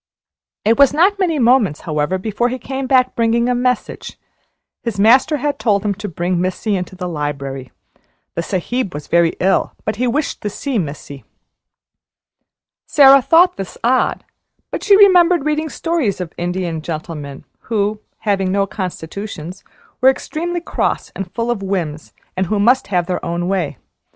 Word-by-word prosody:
It 225 Hz, +4 st, +3 dB
was 280 Hz, 0 st, +5 dB
not 390 Hz, +6 st, +3 dB
many 345 Hz, -5 st, +1 dB
moments, 235 Hz, -, +3 dB
however, 155 Hz, +2 st, -1 dB
before 220 Hz, +5 st, -1 dB
he 255 Hz, -, -3 dB
came 265 Hz, +2 st, -5 dB
back 255 Hz, -1 st, +3 dB
bringing 235 Hz, +1 st, +2 dB
a 250 Hz, -, +2 dB
message. 250 Hz, 0 st, -2 dB, 0.6 s
His 230 Hz, -4 st, -4 dB
master 255 Hz, +8 st, +5 dB
had 290 Hz, 0 st, -2 dB
told 205 Hz, -3 st, +1 dB
him 205 Hz, -, +1 dB
to 205 Hz, +2 st, -6 dB
bring 175 Hz, +1 st, -1 dB
Missy 185 Hz, +3 st, -1 dB
into 185 Hz, 0 st, -4 dB
the 180 Hz, -1 st, -5 dB
library. 140 Hz, -5 st, -4 dB, 0.6 s
The -, -, -2 dB
Sahib 195 Hz, +4 st, -2 dB
was 150 Hz, -, -6 dB
very 170 Hz, -1 st, +2 dB
ill, 190 Hz, +2 st, +1 dB
but 215 Hz, -1 st, -2 dB
he 250 Hz, +2 st, 0 dB
wished 285 Hz, +5 st, -2 dB
to 210 Hz, -, -2 dB
see 260 Hz, +3 st, -2 dB
Missy. 140 Hz, -4 st, -6 dB, 1.6 s
Sara 275 Hz, -1 st, +7 dB
thought 335 Hz, +7 st, +4 dB
this 195 Hz, -2 st, -6 dB
odd, 255 Hz, +2 st, +1 dB, 0.5 s
but -, -, -4 dB
she 400 Hz, -2 st, +6 dB
remembered 360 Hz, -5 st, +5 dB
reading 305 Hz, +1 st, 0 dB
stories 310 Hz, -, -1 dB
of 180 Hz, -3 st, -5 dB
Indian 175 Hz, -2 st, -3 dB
gentlemen 155 Hz, -3 st, -6 dB, 0.2 s
who, 210 Hz, -1 st, -1 dB, 0.2 s
having 195 Hz, -3 st, 0 dB
no 200 Hz, 0 st, +2 dB
constitutions, 185 Hz, -2 st, -6 dB, 0.4 s
were 260 Hz, -, +7 dB
extremely 340 Hz, +6 st, -3 dB
cross -, -, -2 dB
and 195 Hz, -2 st, -5 dB
full 235 Hz, 0 st, -1 dB
of 225 Hz, -4 st, -3 dB
whims, 170 Hz, -6 st, -3 dB, 0.2 s
and 185 Hz, 0 st, -1 dB
who 210 Hz, +3 st, 0 dB
must 245 Hz, +6 st, +3 dB
have 180 Hz, -3 st, 0 dB
their 180 Hz, 0 st, -3 dB
own 170 Hz, +1 st, -2 dB
way. 180 Hz, -8 st, -1 dB
205 Hz, 160 wpm, -18 LUFS, 175-260 Hz, 1.6 s, Sara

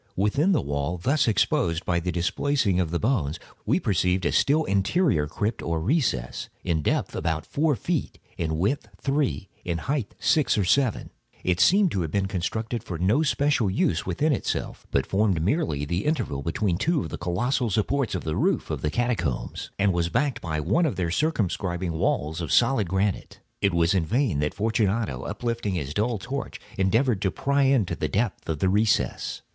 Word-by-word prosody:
Within 120 Hz, -, +2 dB
the 170 Hz, -, +2 dB
wall 70 Hz, +4 st, -2 dB
thus 135 Hz, -, +1 dB
exposed 85 Hz, -5 st, +1 dB
by 85 Hz, -1 st, +1 dB
the 90 Hz, +1 st, -2 dB
displacing 100 Hz, +3 st, +1 dB
of 90 Hz, -3 st, 0 dB
the 85 Hz, -, -1 dB
bones, 90 Hz, -, 0 dB, 0.3 s
we -, -, +3 dB
perceived 90 Hz, -1 st, +1 dB
a -, -, +2 dB
still 155 Hz, +3 st, +3 dB
interior 100 Hz, -, +1 dB, 0.3 s
recess, 85 Hz, -, -1 dB
in 85 Hz, -4 st, 0 dB
depth -, -, -1 dB
about 80 Hz, -1 st, -1 dB
four 150 Hz, 0 st, +1 dB
feet, 170 Hz, +3 st, -2 dB, 0.2 s
in 80 Hz, -2 st, -2 dB
width 100 Hz, -, -1 dB
three, 140 Hz, -7 st, -1 dB, 0.2 s
in 85 Hz, -2 st, -2 dB
height 130 Hz, -, -3 dB
six 145 Hz, -7 st, +2 dB
or 105 Hz, -, +2 dB
seven. 130 Hz, +3 st, +1 dB, 0.3 s
It 90 Hz, -1 st, +1 dB
seemed 185 Hz, -, +5 dB
to 95 Hz, -, -1 dB
have 80 Hz, -, -2 dB
been 100 Hz, +4 st, 0 dB
constructed 110 Hz, +5 st, -3 dB
for 85 Hz, -, -5 dB
no 100 Hz, -, +2 dB
especial 145 Hz, -7 st, +2 dB
use 85 Hz, -3 st, +1 dB, 0.2 s
in 155 Hz, 0 st, +2 dB
itself, -, -, -3 dB
but -, -, +1 dB
formed 95 Hz, -3 st, +1 dB
merely 85 Hz, -, 0 dB
the 85 Hz, +6 st, -2 dB
interval 120 Hz, -, -1 dB
between 85 Hz, +3 st, -1 dB
two 160 Hz, +4 st, +1 dB
of -, -, -5 dB
the -, -, -6 dB
colossal 120 Hz, +7 st, 0 dB
supports 115 Hz, +4 st, 0 dB
of 90 Hz, -, -3 dB
the 80 Hz, -1 st, -2 dB
roof -, -, 0 dB
of -, -, -3 dB
the 75 Hz, -, 0 dB
catacombs, 110 Hz, -, -2 dB
and 100 Hz, -1 st, +2 dB
was 85 Hz, -1 st, 0 dB
backed 140 Hz, -, 0 dB
by 80 Hz, -3 st, -2 dB
one 105 Hz, -, +2 dB
of 125 Hz, -, -2 dB
their 90 Hz, -3 st, -1 dB
circumscribing 95 Hz, -, -1 dB
walls 80 Hz, +1 st, -1 dB
of 80 Hz, -, -4 dB
solid 120 Hz, -5 st, +3 dB
granite. 95 Hz, +1 st, -1 dB, 0.2 s
It 100 Hz, -, +3 dB
was 85 Hz, +1 st, +2 dB
in 90 Hz, -5 st, +1 dB
vain 115 Hz, -, +1 dB
that 75 Hz, 0 st, -1 dB
Fortunato, 110 Hz, 0 st, 0 dB
uplifting 115 Hz, -2 st, -2 dB
his 75 Hz, -4 st, -3 dB
dull 110 Hz, +4 st, 0 dB
torch, 135 Hz, +7 st, -5 dB, 0.2 s
endeavored 105 Hz, +3 st, +2 dB
to 100 Hz, -, +2 dB
pry 140 Hz, +9 st, 0 dB
into 130 Hz, -8 st, +2 dB
the -, -, -2 dB
depths 105 Hz, -3 st, -1 dB
of 80 Hz, -, 0 dB
the 95 Hz, -, +1 dB
recess. 105 Hz, +3 st, 0 dB
100 Hz, 185 wpm, -25 LUFS, 85-130 Hz, 0.3 s, seemed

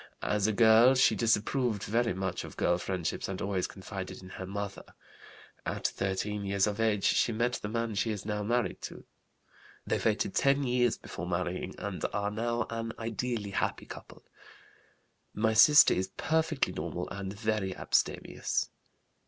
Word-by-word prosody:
As 105 Hz, 0 st, +1 dB
a -, -, +2 dB
girl 115 Hz, +4 st, +6 dB
she 130 Hz, -, +5 dB
disapproved 115 Hz, 0 st, +1 dB
very 115 Hz, -2 st, 0 dB
much 95 Hz, -1 st, -3 dB
of -, -, -10 dB
girl 85 Hz, 0 st, +2 dB
friendships 90 Hz, -3 st, -3 dB
and 95 Hz, -, -4 dB
always 100 Hz, -2 st, -1 dB
confided 95 Hz, -1 st, -7 dB
in 95 Hz, -, -10 dB
her 95 Hz, 0 st, -7 dB
mother. 100 Hz, 0 st, -5 dB, 0.8 s
At -, -, -4 dB
13 100 Hz, +2 st, -1 dB
years 100 Hz, 0 st, +1 dB
of 105 Hz, 0 st, -3 dB
age 110 Hz, -3 st, +1 dB
she -, -, +3 dB
met 120 Hz, +2 st, 0 dB
the 105 Hz, -, -4 dB
man 115 Hz, 0 st, -2 dB
she 105 Hz, +3 st, 0 dB
is 105 Hz, -2 st, -4 dB
now 105 Hz, -1 st, -2 dB
married 120 Hz, +3 st, -1 dB
to. -, -, -8 dB, 0.8 s
They -, -, 0 dB
waited -, -, +1 dB
ten 140 Hz, +1 st, +3 dB
years 125 Hz, -2 st, +2 dB
before 85 Hz, -, -7 dB
marrying 90 Hz, 0 st, -2 dB
and -, -, -5 dB
are 100 Hz, 0 st, -1 dB
now 115 Hz, +2 st, -1 dB
an 115 Hz, 0 st, -3 dB
ideally 115 Hz, -2 st, -3 dB
happy -, -, -1 dB
couple. -, -, -11 dB, 1.1 s
My 110 Hz, +1 st, +2 dB
sister 145 Hz, +7 st, +8 dB
is 95 Hz, +1 st, -1 dB
perfectly 160 Hz, -2 st, 0 dB
normal -, -, -4 dB
and 95 Hz, -1 st, -5 dB
very 105 Hz, -2 st, -2 dB
abstemious. -, -, 0 dB
105 Hz, 160 wpm, -30 LUFS, 95-115 Hz, 1.1 s, sister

